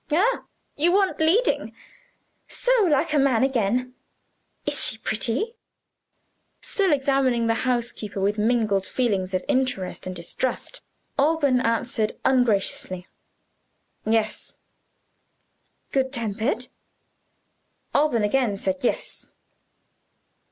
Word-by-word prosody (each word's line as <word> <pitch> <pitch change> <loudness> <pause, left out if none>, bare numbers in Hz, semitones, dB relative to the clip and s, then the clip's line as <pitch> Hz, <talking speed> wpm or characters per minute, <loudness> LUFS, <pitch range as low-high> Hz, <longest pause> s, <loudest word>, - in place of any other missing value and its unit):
Ah, 410 +11 +2 0.3
you 330 +4 +3
want 390 0 +2
leading. 345 +10 +2 0.7
So - - -1
like 305 -1 +2
a 295 - +4
man 260 -4 +3
again! 250 -1 0 0.7
Is 290 -1 +2
she 220 - +3
pretty?" 230 - -1 1.1
Still 390 -4 0
examining 270 -4 +2
the 225 - +2 0.2
housekeeper 235 -4 -2
with 205 +2 0
mingled 215 -3 +2
feelings 200 -7 0
of 185 - -2
interest 255 -11 -1
and 185 - -5
distrust, 175 +9 -3 0.4
Alban 285 -3 +3
answered 230 -2 0
ungraciously: 210 -7 +1 1.0
"Yes." 220 0 0 1.4
"Good 265 -1 +1
tempered?" 235 0 -2 1.2
Alban 285 -7 +2
again 210 -1 +1
said 280 +7 -1
"Yes." - - -2
250 Hz, 95 wpm, -24 LUFS, 215-280 Hz, 1.4 s, a